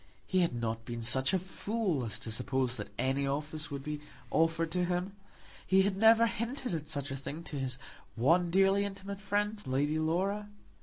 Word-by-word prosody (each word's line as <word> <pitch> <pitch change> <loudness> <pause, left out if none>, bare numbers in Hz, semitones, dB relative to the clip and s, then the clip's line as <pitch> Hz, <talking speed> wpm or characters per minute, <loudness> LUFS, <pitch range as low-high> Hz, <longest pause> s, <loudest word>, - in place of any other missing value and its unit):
He 185 - +1
had 170 -8 +2
not 115 -1 -2
been 115 0 -5
such 130 +3 +3
a 190 - +3
fool 190 - -2
as 110 -3 -3
to 110 - -3
suppose 125 +1 0
that - - -6
any 135 +1 +1
office 150 +2 -3
would 140 -2 -5
be 150 0 -4 0.3
offered 165 0 +2
to 180 +1 +1
him. 180 +2 -2 0.5
He 190 0 +5
had 195 0 +1
never 225 +3 +6
hinted 235 +1 -2
at 155 -2 -3
such 145 -2 -3
a - - -2
thing 145 +4 -6
to 145 -3 -5
his 130 -1 -2 0.4
one 165 +9 +3
dearly 195 +2 +4
intimate 200 0 -5
friend, 205 +2 0
Lady 145 +4 +1
Laura. 195 +6 0
165 Hz, 190 wpm, -32 LUFS, 135-195 Hz, 0.5 s, never